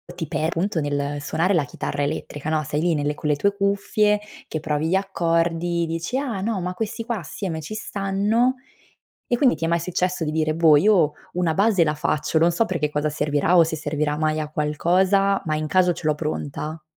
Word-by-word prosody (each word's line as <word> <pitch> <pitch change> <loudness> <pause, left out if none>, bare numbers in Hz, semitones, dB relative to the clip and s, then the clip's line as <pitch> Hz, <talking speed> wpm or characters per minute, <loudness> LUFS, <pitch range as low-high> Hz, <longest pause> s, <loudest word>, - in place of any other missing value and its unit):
ti 165 - -4
per 155 - -1
appunto 170 +1 -1
nel 145 0 -2
suonare 170 +6 0
la 155 -5 +2
chitarra 145 - -3
elettrica, 145 0 -4
no, 155 -1 +1
sei 150 +2 -2
lì 175 -1 +2
nelle 145 0 0
con 150 0 -4
le 145 - +3
tue 200 +7 +1
cuffie, 200 +1 +1 0.3
che 155 - -3
provi 150 0 -1
gli 190 - +2
accordi, 170 -2 0
dici: 165 +9 -3
"Ah, 240 -9 -2
no. 215 -2 -1
Ma 180 +1 -3
questi 225 +3 -4
qua 235 -4 -2
assieme 165 0 -5
ci 185 +8 -7
stanno." 210 +5 0 0.7
E 240 - +1
quindi 250 - +3
ti 165 - -4
è 165 - +1
mai 170 0 +1
successo 180 0 -1
di 150 - -1
dire: 155 0 0
"Boh, 160 -2 +6
io 175 -4 +4 0.2
una 170 -3 0
base 200 -2 +3
la 150 0 0
faccio, 150 +1 0
non 170 +2 +3
so 230 - +2
per 185 - -2
che 150 -2 0
cosa 150 +1 0
servirà 150 +3 +1
o 170 - +7
se 160 0 -3
servirà 150 0 -1
mai 155 0 0
a 150 - -3
qualcosa, 185 +6 +2
ma 155 -1 -1
in 155 0 -2
caso 180 +2 +3
ce 160 - -7
l'ho 155 - +3
pronta"? 150 0 -4
165 Hz, 215 wpm, -23 LUFS, 150-195 Hz, 0.7 s, o